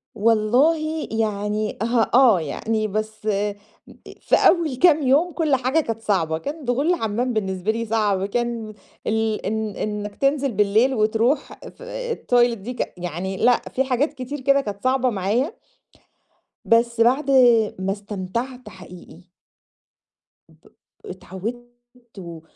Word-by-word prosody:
والله، 265 +9 +2
يعني 210 -1 -2
آه، 230 0 +1
آه، 240 -8 +6
يعني 215 +8 -2
بس 215 +1 -4
أ 205 -1 0 0.7
في - - +3
أول 330 -7 +3
كام 305 +1 +4
يوم 305 +7 +3
كل 305 -5 +1
حاجة 260 +5 +1
كانت 225 -6 -3
صعبة، 165 -7 0
كان 285 - -6
دخول 270 +7 +1
لحمام 245 -5 -1
بالنسبة 190 -1 -1
لي 230 +1 -3
صعب، 210 -3 0
كان 230 0 -3 0.3
ال 220 0 -1
إن 220 +1 -2
إنك 210 -1 -4
تنزل 275 -1 +1
بالليل 210 +5 +2
وتروح 225 +5 +1 0.2
في - - -15
آآ، - - -4
الToilet 245 -1 +2
دي 230 +6 -7
ك - - -4
يعني 180 +2 -4
لأ 245 +3 +3
في 265 - +2
حاجات 270 +3 0
كتير 275 +1 -6
كده 275 +1 +3
كانت 200 -4 -7
صعبة 255 0 +2
معايا، 220 - -1 1.1
بس 235 0 +2
بعد 265 +4 +3 0.5
ما 190 +1 -1
استمتعت 210 +6 -5
حقيقي. 180 -1 -14 1.2
ب - - -23 0.4
اتعودت 190 +6 -7 0.5
و 170 -3 -9
225 Hz, 135 wpm, -22 LUFS, 205-265 Hz, 1.2 s, آه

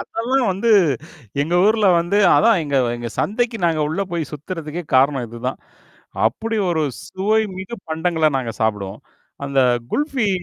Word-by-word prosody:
அதெல்லாம் 245 +2 -1
வந்து 225 +5 0 0.7
எங்க 165 +4 -2
ஊர்ல 215 -1 +3
வந்து 175 +4 0 0.2
அதான் 225 -2 +4
எங்க 140 -1 -1 0.2
எங்க 120 0 -5
சந்தைக்கு 230 +2 0
நாங்க 160 -2 +1
உள்ள 160 +5 -2
போய் 160 -5 -3
சுத்துறதுக்கே 155 +2 -6
காரணம் 135 -1 +3
இதுதான். 115 0 -5 0.7
அப்படி 220 - -2
ஒரு 160 -2 0 0.2
சுவை 210 +4 +1 0.2
மிகு 190 +5 -6
பண்டங்கள்ல 160 -1 +1
நாங்க 115 -3 -4
சாப்பிடுவோம். 105 -1 -2 0.4
அந்த 140 -1 +1 0.3
குல்ஃபி 275 -7 0
170 Hz, 140 wpm, -20 LUFS, 140-220 Hz, 0.7 s, அதான்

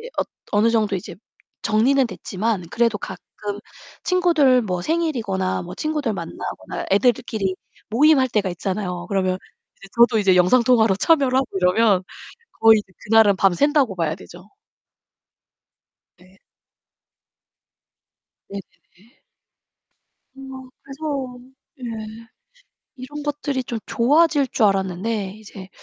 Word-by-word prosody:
이제 480 +2 -9 0.4
어느 215 +3 +3
정도 215 -3 +1
이제 175 - -8 0.5
정리는 255 +5 +3
됐지만, 205 -2 -3
그래도 230 -3 +1
가끔 190 -2 -8 0.8
친구들 330 -9 +3
뭐 180 -4 -3
생일이거나 235 - -1
뭐 180 +1 -8
친구들 300 -7 -2
만나거나, 170 -4 -6
애들끼리 215 -2 +1 0.3
모임할 265 +3 +4
때가 210 -5 0
있잖아요. 180 0 -4
그러면 185 -2 0 0.6
저도 235 -1 +5
이제 190 -3 +3
영상통화로 225 +2 +4
참여를 275 -2 +3
하고 265 - +2
이러면 190 +1 +3 0.6
거의 220 -1 +7 0.3
그날은 220 -3 +5
밤 195 -1 +3
샌다고 280 - +2
봐야 165 -3 -1
되죠. 180 +4 -14 1.7
네. 185 +2 -22 2.1
네네네. 200 +2 -13 1.2
어 265 -1 -10
그래서 275 -3 -5 0.4
예 225 -1 -7 0.7
이런 285 +3 -8
것들이 290 -2 -2
좀 235 -2 -5
좋아질 290 +3 +3
줄 225 -3 +1
알았는데 195 +1 -1
이제 200 -3 -12
225 Hz, 250 characters per minute, -21 LUFS, 190-265 Hz, 2.1 s, 거의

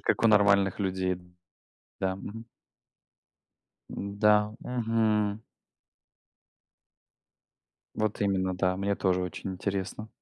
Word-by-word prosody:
как - - 0
у 115 - +6
нормальных 100 -2 +4
людей. 95 -2 0 0.8
Да, 95 0 0
мгм. 115 +3 -8 1.4
М-да. 105 +1 +2
Мгм. 110 -3 0 2.5
Вот 110 -1 -1
именно, 95 -2 +1
да. 90 0 +1
Мне 100 +1 -1
тоже 90 -1 +1
очень 95 +1 -5
интересно. 100 +3 -4
100 Hz, 90 wpm, -28 LUFS, 95-105 Hz, 2.5 s, у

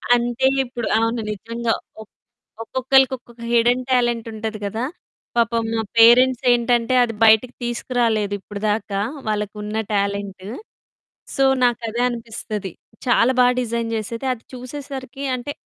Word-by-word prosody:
అంటే 240 +2 +1 0.2
ఇప్పుడు 245 -2 -5
అవును 230 +1 0
నిజంగా. 230 +2 -2 0.3
ఒక 220 - -13 0.5
ఒక్కొక్కళ్ళకి 265 +2 +3
ఒక్కొక్క 240 -1 -17
హిడెన్ 240 +2 +3
టాలెంట్ 240 -2 +1
ఉంటది 220 0 -5
కదా! 220 +3 -3 0.5
పాపం 230 0 +2
మా 225 - 0 0.2
పేరెంట్స్ 245 +2 +6
ఏంటంటే, 240 0 +2
అది 230 -2 -1
బయటికి 220 +3 +5
తీసుకురాలేదు 235 -4 0
ఇప్పటిదాకా 205 0 -2 0.3
వాళ్ళకున్న 210 0 -3 0.2
టాలెంటు. 200 -1 -2 0.9
సో, 275 - +2 0.2
నాకు 240 -1 +3
అదే 235 +2 -2
అనిపిస్తది. 220 -4 -5 0.3
చాలా 245 0 +4
బా 250 - +7
డిజైన్ 235 -1 -2
చేసేది, 230 +3 -4
అది 230 - -13
చూసేసరికి 265 +1 -7
అంటే 250 +3 -5
235 Hz, 125 wpm, -21 LUFS, 220-245 Hz, 0.9 s, బా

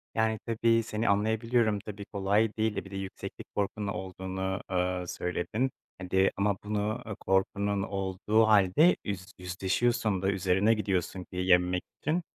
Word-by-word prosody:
Yani, 110 -1 +1
tabii, 115 0 +2
seni 110 0 -1
anlayabiliyorum. 110 +1 +2
Tabii, 100 0 -8
kolay 100 +2 +1
değil. 110 -1 0
E, - - -3
bir 95 - -12
de - - -6
yükseklik 95 -1 -7
korkunun 100 0 -1
da 100 - -2
olduğunu, 95 +1 -4
eee, 90 0 0
söyledin. 95 +10 -2 0.3
Hadi, 95 +1 +2
ama 100 -1 +1
bunu, 105 +3 -1
ııı, 105 - -5
korkunun 100 +1 +1
olduğu 100 +3 +1
hâlde, 105 - +5
üz 100 -3 -4
yüzleşiyorsun 95 +3 0
da 95 - +1
üzerine 95 +3 +3
gidiyorsun 95 -4 -1
ki 90 - -14
yenmek 90 0 +3 0.2
için. 160 +5 +1
100 Hz, 150 wpm, -29 LUFS, 95-110 Hz, 0.3 s, hâlde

